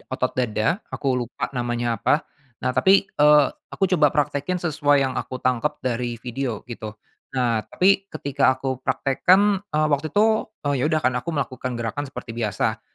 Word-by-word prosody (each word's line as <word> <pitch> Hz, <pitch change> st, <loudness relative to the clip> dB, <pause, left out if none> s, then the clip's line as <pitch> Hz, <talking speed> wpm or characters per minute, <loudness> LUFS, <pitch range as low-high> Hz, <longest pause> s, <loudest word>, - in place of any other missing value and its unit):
otot 130 Hz, -1 st, -1 dB
dada, 125 Hz, -, 0 dB
aku 135 Hz, -2 st, -1 dB
lupa 120 Hz, +3 st, -4 dB
namanya 120 Hz, -1 st, -2 dB
apa. 150 Hz, -, +2 dB, 0.4 s
Nah, 125 Hz, -, +1 dB
tapi, 195 Hz, +6 st, +4 dB
eee, 150 Hz, -1 st, +6 dB, 0.2 s
aku 195 Hz, -, -1 dB
coba 150 Hz, -4 st, +5 dB
praktekin 145 Hz, +4 st, -1 dB
sesuai 145 Hz, -5 st, +2 dB
yang 130 Hz, -, -1 dB
aku 130 Hz, -, -6 dB
tangkep 130 Hz, +3 st, -1 dB
dari 120 Hz, -1 st, -2 dB
video 120 Hz, -1 st, -4 dB
gitu. 110 Hz, -3 st, -8 dB, 0.4 s
Nah, 120 Hz, -3 st, +1 dB
tapi 195 Hz, +1 st, +2 dB
ketika 140 Hz, -4 st, +1 dB
aku 130 Hz, -1 st, -3 dB
praktekkan, 185 Hz, +10 st, +2 dB
eee, 155 Hz, -1 st, +1 dB
waktu 145 Hz, +3 st, 0 dB
itu, 220 Hz, +6 st, +2 dB, 0.2 s
eee, 145 Hz, -3 st, 0 dB
ya -, -, +1 dB
udah 155 Hz, -1 st, +1 dB
kan 125 Hz, -, +3 dB
aku 170 Hz, -, -12 dB
melakukan 130 Hz, -5 st, -3 dB
gerakan 120 Hz, +5 st, -3 dB
seperti 115 Hz, -, -8 dB
biasa. 115 Hz, -3 st, -1 dB
135 Hz, 165 wpm, -23 LUFS, 125-155 Hz, 0.4 s, eee